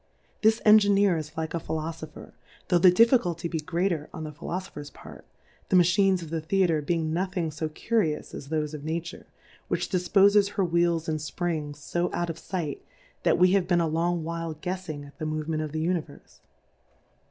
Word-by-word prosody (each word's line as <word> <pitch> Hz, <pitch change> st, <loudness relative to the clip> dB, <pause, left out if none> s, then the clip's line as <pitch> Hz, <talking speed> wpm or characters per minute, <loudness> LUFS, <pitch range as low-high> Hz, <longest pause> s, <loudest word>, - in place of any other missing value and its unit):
This 220 Hz, +1 st, +3 dB
Engineer 205 Hz, -3 st, +6 dB
is 155 Hz, 0 st, -6 dB
like 160 Hz, -1 st, -3 dB
a 170 Hz, -, -1 dB
Philo 160 Hz, 0 st, -3 dB
fopher, 160 Hz, -1 st, -11 dB, 0.4 s
tho' 175 Hz, -2 st, +4 dB
the 185 Hz, -, +8 dB
Difficulty 180 Hz, -5 st, +3 dB
be 165 Hz, -1 st, -3 dB
greater 170 Hz, 0 st, -1 dB
on 160 Hz, -, -7 dB
the 155 Hz, -, -5 dB
Philofopher's 160 Hz, -1 st, -6 dB
part, -, -, -13 dB, 0.4 s
the -, -, +3 dB
Machines 180 Hz, +1 st, +4 dB
of 160 Hz, -, -10 dB
the 165 Hz, -1 st, -2 dB
Theatre 165 Hz, -1 st, +1 dB
being 160 Hz, +1 st, -1 dB
nothing 180 Hz, -2 st, -1 dB
fo 155 Hz, +1 st, -3 dB
Curi 160 Hz, -1 st, 0 dB
ous -, -, -13 dB
as 140 Hz, -, -8 dB
thofe 155 Hz, 0 st, -2 dB
of 150 Hz, -2 st, -7 dB
Nature, 170 Hz, +2 st, -5 dB, 0.4 s
which -, -, -2 dB
difpofes 200 Hz, +2 st, +4 dB
her 195 Hz, -4 st, +1 dB
Wheels 170 Hz, -1 st, +1 dB
and 155 Hz, -1 st, -1 dB
Springs 150 Hz, -2 st, -4 dB
fo 175 Hz, +1 st, +1 dB
out 175 Hz, -1 st, -1 dB
of 165 Hz, -, -10 dB
fight, 165 Hz, -4 st, -4 dB, 0.4 s
that -, -, +3 dB
we 180 Hz, +1 st, +5 dB
have 190 Hz, -2 st, +2 dB
been 175 Hz, -2 st, +3 dB
a 165 Hz, -, +1 dB
long 165 Hz, +1 st, 0 dB
while 165 Hz, 0 st, -4 dB
guefs 180 Hz, +3 st, -5 dB
ing 145 Hz, -2 st, -5 dB
at 140 Hz, +4 st, -16 dB
the 155 Hz, -, -3 dB
Movement 155 Hz, 0 st, -2 dB
of 155 Hz, -1 st, -4 dB
the 155 Hz, +1 st, -2 dB
Univerfe. 165 Hz, -4 st, -4 dB
170 Hz, 190 wpm, -27 LUFS, 155-185 Hz, 0.4 s, the